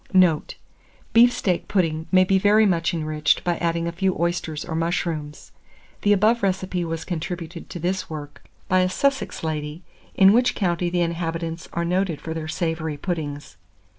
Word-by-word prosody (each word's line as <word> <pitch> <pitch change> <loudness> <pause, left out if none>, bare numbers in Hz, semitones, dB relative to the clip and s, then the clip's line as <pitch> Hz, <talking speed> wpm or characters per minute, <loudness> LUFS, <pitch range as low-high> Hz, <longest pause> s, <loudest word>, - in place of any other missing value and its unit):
Note. 180 -5 +3 0.6
Beef 240 +2 +7
steak 180 -7 -1
pudding 160 -4 0
may 185 -1 +6
be 190 +1 +2
very 210 +2 +5
much 170 -3 +1
enriched 155 -3 0
by 175 -1 0
adding 170 0 0
a - - -1
few 185 +2 0
oysters 170 -2 -2
or - - -5
mushrooms. 165 -3 -3 0.5
The 205 - +3
above 215 +4 +4
recipe 185 -2 -1
was 165 -1 -4
contributed 170 -1 -5
to - - -6
this 180 +3 -2
work 145 -2 -8 0.3
by 185 - +3
a 185 0 +2
Sussex 275 +3 -1
lady, 155 +1 -4 0.3
in 195 +1 +7
which 245 +2 +3
county 175 -3 0
the 175 0 0
inhabitants 165 -1 -3
are 170 0 -1
noted 180 -2 0
for 160 - -5
their 160 -1 -5
savoury 160 -2 -2
puddings. 145 -4 -5
170 Hz, 165 wpm, -23 LUFS, 160-185 Hz, 0.6 s, Beef